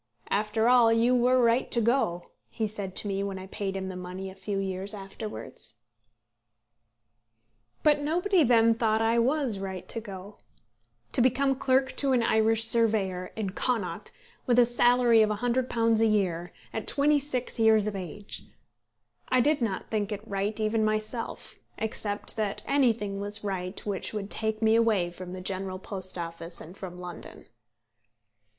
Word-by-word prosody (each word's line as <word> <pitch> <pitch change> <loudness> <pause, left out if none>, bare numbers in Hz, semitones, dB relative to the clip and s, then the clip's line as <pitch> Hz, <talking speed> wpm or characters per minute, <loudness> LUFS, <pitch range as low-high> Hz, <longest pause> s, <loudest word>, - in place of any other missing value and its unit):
"After 215 +2 +1
all 245 -2 +6
you 230 +2 +3
were 250 +1 +4
right 235 +1 +3
to 235 - +1
go," 220 -7 0 0.2
he 220 -2 -2
said 200 -3 -5
to - - +6
me 195 -1 -1
when 200 -1 -3
I 190 - -7
paid 195 0 -4
him 190 0 -4
the 190 - -6
money 185 +1 -6
a - - -11
few 200 +1 -4
years 195 +1 -3
afterwards. 195 - -6 2.0
But 300 -1 +4
nobody 350 +6 +2
then 230 -2 +5
thought 220 -1 +1
I 230 +1 +3
was 255 -4 +1
right 190 -2 -6
to 230 - +2
go. 200 -1 -10 0.7
To - - +1
become 265 +2 +3
clerk 265 0 +1
to 275 -2 +2
an 240 -2 +3
Irish 225 0 +3
surveyor, 210 -6 +2
in 210 -4 -3
Connaught, 220 -2 -2 0.4
with 245 -1 +3
a 245 - +7
salary 240 -1 +4
of 215 - +3
£100 230 0 +1
a 225 - +4
year, 180 -5 0 0.2
at 220 - -4
twenty 290 +1 +3
six 260 -4 -4
years 220 -2 +5
of 215 -1 -2
age! 195 +2 -7 0.9
I 255 - +3
did 290 +2 +2
not 210 -5 -2
think 210 -1 -1
it 210 +1 -6
right 200 +1 -2
even 215 0 +1
myself, 215 +2 -3 0.2
except 210 -1 -3
that 210 -2 -2
anything 225 -8 +1
was 205 +1 -4
right 190 -1 -3
which 200 0 -3
would 205 -1 -4
take 220 0 -1
me 220 0 +5
away 215 -7 +2
from 180 +1 -9
the 185 - -6
General 185 0 -3
Post 185 -1 -3
Office 165 0 -5
and 175 +4 -11
from 180 -3 -8
London. 180 -1 -9
215 Hz, 165 wpm, -28 LUFS, 195-235 Hz, 2.0 s, a